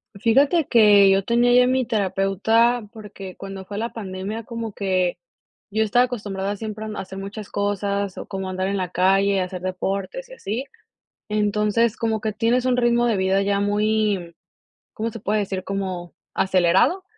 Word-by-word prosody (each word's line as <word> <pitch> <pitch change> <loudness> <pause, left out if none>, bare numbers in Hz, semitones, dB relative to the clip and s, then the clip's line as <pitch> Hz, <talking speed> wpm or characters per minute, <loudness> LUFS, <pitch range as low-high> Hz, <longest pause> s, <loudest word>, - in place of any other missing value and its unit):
Fíjate 275 - +3
que 205 -4 +6
yo 195 0 +3
tenía 240 +2 +3
ya 250 0 +6
mi 260 0 +1
terapeuta, 220 +3 +1
porque 205 -4 -10
cuando 195 -1 -8
fue 200 +1 -7
la 230 +2 -3
pandemia, 200 +1 -5
como 230 -2 -6
que 185 -3 0 0.5
yo 215 +2 +1
estaba 245 +4 +3
acostumbrada 205 -4 -4
siempre 215 +1 -6
a - - -5
m 215 - -6
a - - -2
hacer 190 0 -8
muchas 200 +1 -7
cosas, 200 -1 -2
o - - -6
como 190 -1 -4
andar 185 0 -2
en 200 - -1
la 185 -2 -2
calle, 195 +2 +3
hacer 180 0 -5
deportes 195 - -3
y - - -11
así. 235 - -4 0.7
Entonces, 210 +2 +1
como 225 -1 -1
que 215 0 -2
tienes 235 +4 +1
un 255 -1 +2
ritmo 240 0 +3
de 225 - +2
vida 190 +1 +2
ya 200 0 +1
muy, 205 -3 0 0.6
¿cómo 225 +1 -3
se 230 - -8
puede 210 +1 0
decir? 190 -1 -4
Como 185 -3 -4 0.2
¿acelerado? 190 - +3
205 Hz, 175 wpm, -22 LUFS, 195-230 Hz, 0.7 s, que